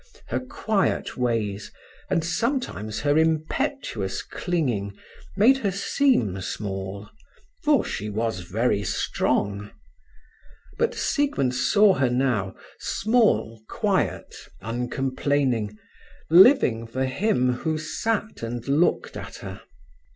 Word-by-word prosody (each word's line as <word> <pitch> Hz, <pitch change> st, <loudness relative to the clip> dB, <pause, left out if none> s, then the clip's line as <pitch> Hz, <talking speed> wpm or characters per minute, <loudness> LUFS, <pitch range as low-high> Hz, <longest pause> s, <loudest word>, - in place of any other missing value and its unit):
Her -, -, 0 dB
quiet 220 Hz, -6 st, -1 dB
ways, 110 Hz, -5 st, -1 dB, 0.4 s
and 165 Hz, -, +1 dB
sometimes 165 Hz, -, -2 dB
her 145 Hz, +1 st, +3 dB
impetuous 160 Hz, -, -1 dB
clinging 120 Hz, -, -2 dB, 0.4 s
made 265 Hz, +3 st, +6 dB
her 205 Hz, -, 0 dB
seem 190 Hz, -, +1 dB
small; 95 Hz, 0 st, -5 dB, 0.6 s
for 300 Hz, -2 st, +3 dB
she 105 Hz, 0 st, -4 dB
was 110 Hz, -2 st, -2 dB
very 100 Hz, +4 st, 0 dB
strong. 100 Hz, 0 st, -1 dB, 1.1 s
But -, -, +1 dB
Siegmund 140 Hz, -, 0 dB
saw 195 Hz, +11 st, +4 dB
her 130 Hz, -4 st, +1 dB
now, 120 Hz, -7 st, 0 dB, 0.2 s
small, 215 Hz, -, +1 dB
quiet, -, -, -1 dB, 0.3 s
uncomplaining, 125 Hz, 0 st, -1 dB, 0.5 s
living 170 Hz, -, +6 dB
for 130 Hz, +3 st, -2 dB
him 130 Hz, -, +1 dB
who 155 Hz, +5 st, -2 dB
sat 215 Hz, +7 st, -2 dB
and 115 Hz, +1 st, -5 dB
looked 150 Hz, +6 st, +1 dB
at -, -, -7 dB
her. -, -, -7 dB
130 Hz, 100 wpm, -25 LUFS, -, 1.1 s, made